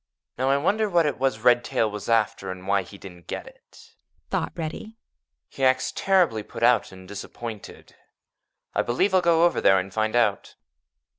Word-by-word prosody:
"Now, 130 +1 +1
I 140 - +3
wonder 210 +8 +1
what 170 -3 +3
it 145 -4 -2
was 130 -5 0
Redtail 120 -2 +2
was 105 +2 -7
after 115 -4 +1
and 95 0 -7
why 100 0 +2
he 100 +2 -12
didn't 90 -4 -13
get - - -5
it," - - -18 0.4
thought - - -1
Reddy. 175 +7 -6 0.5
"He 135 - -7
acts 130 0 +2
terribly 180 - +2
put - - -8
out - - +3
and 95 -1 -13
disappointed. 105 +2 -9 0.8
I - - +2
believe 185 +12 0
I'll 185 - +5
go 170 -1 +4
over 175 - +1
there 95 - +5
and 95 +1 -3
find 110 +1 -1
out." 110 -5 +1
120 Hz, 175 wpm, -24 LUFS, 100-165 Hz, 0.8 s, I'll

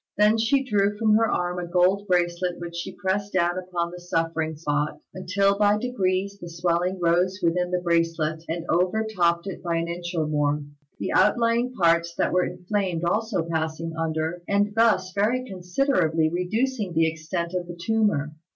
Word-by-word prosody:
Then 210 +2 +4
she 265 +5 +2
drew 205 -4 +1
from 215 -1 +3
her 225 +1 +4
arm 180 0 -1
a 175 - -4
gold 185 +3 +2
bracelet 175 -1 0
which 170 0 -7
she 170 +2 -5
pressed 195 +2 -2
down 175 -1 +2
upon 175 -2 -3
the 180 - -9
suffering 165 -2 -1
spot, 150 -1 -2
until 195 +2 +1
by 205 0 +4
degrees 200 -4 -1
the 175 - -7
swelling 175 +2 0
rose 180 +3 +2
within 180 +1 +1
the 180 0 -1
bracelet 165 -2 0
and 165 +1 -3
overtopped 180 -2 +1
it 195 -3 -6
by 170 -1 -1
an 165 0 -1
inch 175 +1 -5
and 155 -2 0
more, 150 0 +1 0.3
the - - -3
outlying 235 +1 +3
parts 170 -3 +2
that - - 0
were 180 0 +3
inflamed 180 -1 -2
also 210 +1 0
passing 160 0 -2
under, 160 +1 -2
and 205 +1 +1
thus 215 -5 +3
very 230 +6 +1
considerably 180 - +1
reducing 210 +3 -1
the 165 0 +3
extent 165 +2 -3
of 180 -1 -2
the 175 0 -8
tumour. 205 -6 +1
180 Hz, 170 wpm, -25 LUFS, 170-200 Hz, 0.3 s, Then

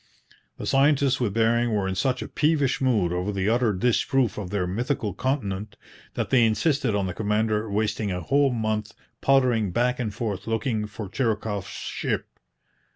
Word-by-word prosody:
The - - -6
scientists 140 -1 +3
with 110 -5 -1
Bering 115 0 +2
were 100 -2 0
in 95 - -1
such 130 +5 0
a - - -7
peevish 150 -4 +1
mood 105 -10 +2
over 90 +3 -1
the 100 -1 -1
utter 120 -1 +2
disproof 120 +3 +1
of 95 -4 -5
their 100 -2 -1
mythical 110 +3 -2
continent 105 -7 -2 0.4
that - - -2
they 130 -3 +5
insisted 115 +1 +1
on 100 -1 0
the 90 - -3
commander 110 +1 0
wasting 105 0 -1
a 90 - -2
whole 140 - +3
month 110 -2 -2 0.3
pottering 125 -6 +3
back 125 +6 +1
and 115 -4 -2
forth 105 -2 -4
looking 110 -1 -1
for 105 0 -7
Chirikoff's 105 -3 -2
ship. - - -4
110 Hz, 165 wpm, -25 LUFS, 105-125 Hz, 0.4 s, they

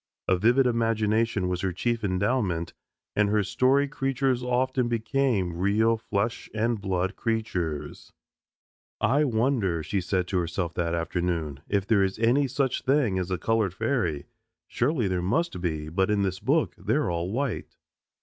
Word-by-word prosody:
A 95 - +4
vivid 120 +8 +3
imagination 115 -3 +1
was 90 0 -2
her 95 - 0
chief 115 +5 -1
endowment, 95 -3 0 0.4
and 105 -1 +3
her 105 0 +2
story 135 +7 +2
creatures 135 -2 0
often 125 0 0
became 115 -6 0
real 105 +5 +2
flesh 115 +1 -2
and 115 0 0
blood 95 0 -1
creatures. 90 -10 -3 0.9
"I 140 +6 +3
wonder," 110 - +1
she 95 +6 -1
said 90 0 -1
to 95 - +1
herself 85 0 -2
that 85 -1 -1
afternoon, 85 -4 -2
"if 100 -1 +1
there 105 -1 +3
is 95 0 0
any 120 +6 +3
such 135 0 -1
thing 130 -8 +2
as 90 0 -3
a 90 - -1
colored 105 0 0
fairy? 90 - -1 0.4
Surely 125 -4 0
there 90 -1 -1
must 100 - -1
be, 80 -4 -2
but 95 +5 0
in 105 -1 +2
this 95 -1 -2
book 140 +8 +1
they're 145 -9 0
all 85 +2 -2
white." 130 +1 -3
105 Hz, 155 wpm, -26 LUFS, 90-125 Hz, 0.9 s, A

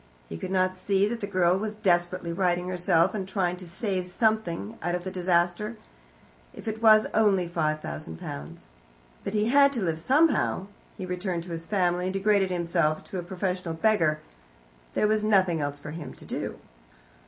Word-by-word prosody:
He 80 - -5
could - - -5
not 185 0 +2
see 195 +1 +1
that 230 +2 -3
the 200 - -4
girl 185 -2 +2
was 215 0 -3
desperately 175 -4 0
righting 180 0 0
herself, 175 -1 +2
and 195 -3 -3
trying 185 -3 0
to 180 -1 -10
save 190 0 -2
something 180 - -1
out 175 +2 -1
of 180 - -4
the 185 - -5
disaster, 180 +4 0 0.8
if - - -10
it 220 0 -3
was 215 -1 +7
only 200 -5 +3
five 155 -3 -1
thousand 75 +2 -6
pounds. 70 -2 -8 0.6
But 210 - -4
he 210 +2 +2
had 280 +2 +6
to 235 -6 -1
live 165 -3 -1
somehow. 270 - +2 0.3
He 185 - -5
turned 180 -2 -2
to 175 - -9
his 165 0 -5
family, 180 -3 +1
and 185 - -2
degraded 195 -1 +2
himself 170 -3 0
to 190 - -6
a - - -2
professional 180 -1 -3
beggar. 160 -5 +2 0.7
There - - +2
was 215 0 +1
nothing 185 -6 +3
else 145 0 -2
for 150 +1 -8
him 160 -1 -7
to - - -14
do. - - -4
185 Hz, 185 wpm, -27 LUFS, 170-205 Hz, 0.8 s, was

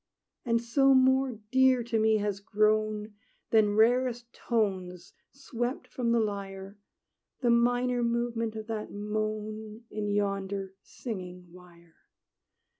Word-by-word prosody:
And 230 -2 +1
so 270 +3 +3
more 260 0 +4 0.2
dear 260 -1 +4
to 230 -1 -1
me 220 0 +3
has 205 -1 -2
grown, 215 0 0 0.4
Than 210 -2 +4
rarest 240 +1 +2
tones 185 -6 -2 0.2
swept 250 -2 -4
from 240 -2 -2
the 235 - +3
lyre, 200 -1 -4 0.6
The 240 -2 +3
minor 245 +1 +2
movement 235 -1 -1
of 220 -1 -6
that 220 -1 -5
moan 215 +1 -4
In 210 -1 -3
yonder 195 -1 -2
singing 180 -6 -8
wire. 170 -2 -18
215 Hz, 115 wpm, -29 LUFS, 205-240 Hz, 0.6 s, more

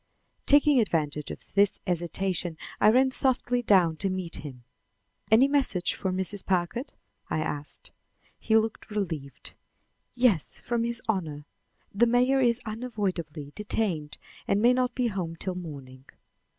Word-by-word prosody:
Taking 290 -1 +6
advantage 150 -8 -1
of - - -10
this 200 0 +3
hesitation, 175 0 -1 0.2
I 210 - +6
ran 260 +4 +4
softly 250 -2 +1
down 180 -8 +4
to 195 - -1
meet 185 -3 -3
him. 130 -5 -9 0.7
"Any 225 +5 +6
message 270 -11 +1
for 190 - -2
Mrs. 190 +2 -2
Packard?" 190 - -1 0.4
I - - -1
asked. 150 -2 -4 0.5
He 220 0 +3
looked 220 0 -2
relieved. 165 -10 -4 0.6
"Yes, 240 - +2
from 235 -1 -1
his 235 +1 -3
Honor. 160 -9 -2 0.5
The 235 +4 +4
mayor 250 +3 +3
is 240 0 +2
unavoidably 190 - -4
detained 195 -8 -2 0.3
and 200 - +2
may 240 +3 +5
not 250 0 0
be 250 - 0
home 185 -7 -2
till 185 +3 -3
morning." 140 -7 -9
195 Hz, 135 wpm, -27 LUFS, 165-235 Hz, 0.7 s, Taking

